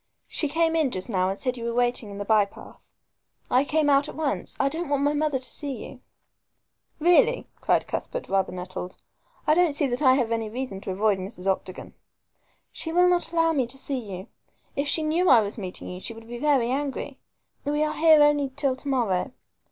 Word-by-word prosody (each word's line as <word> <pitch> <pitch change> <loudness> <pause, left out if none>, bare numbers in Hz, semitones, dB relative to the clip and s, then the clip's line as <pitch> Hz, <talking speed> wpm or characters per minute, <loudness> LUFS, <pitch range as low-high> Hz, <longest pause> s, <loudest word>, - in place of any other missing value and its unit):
"She 300 - -1
came 325 +2 +1
in 315 -4 +2
just 185 -1 -5
now 185 -3 +1
and 195 - -3
said 255 +1 -2
you 235 - -6
were 235 0 -2
waiting 245 -3 0
in 200 - -8
the 205 - -4
by 215 0 +4
path. 200 - -13 0.6
I 255 +2 +4
came 305 +1 +1
out 280 0 +3
at - - -9
once. 300 -2 -2
I 275 - +3
don't 320 +3 -3
want 285 -1 +1
my 290 +1 +2
mother 300 -2 +1
to 255 - -4
see 285 +2 -3
you." 265 - -11 1.0
"Really!" 445 +10 +4
cried - - +1
Cuthbert, - - -4
rather 195 -1 +1
nettled. 180 0 -6 0.5
"I 305 - +4
don't 340 -2 +3
see 290 - +2
that 250 +1 -2
I 260 -3 +6
have 245 -4 0
any 225 -1 -1
reason 235 -4 -5
to - - -7
avoid 200 +1 +1
Mrs. 185 -1 -7
Octagon." 190 -1 -3 0.8
"She 325 - -4
will 355 +2 +4
not 355 -1 +2
allow 330 -1 +2
me 265 -5 +1
to 260 +3 -7
see 270 0 -3
you. 195 -5 -8 0.5
If 280 +1 -1
she 315 +2 +2
knew 335 +4 +2
I 240 -4 +7
was 210 +2 -4
meeting 185 -2 -6
you 180 - -6
she 230 +4 -4
would 225 0 -13
be 240 0 -7
very 265 -4 +2
angry. 275 0 -3 0.4
We 295 +1 0
are 305 - -1
here 315 -2 +6
only 290 -2 +3
till 275 -3 +1
to 285 - -8
morrow. 240 -4 0
265 Hz, 215 wpm, -25 LUFS, 215-300 Hz, 1.0 s, I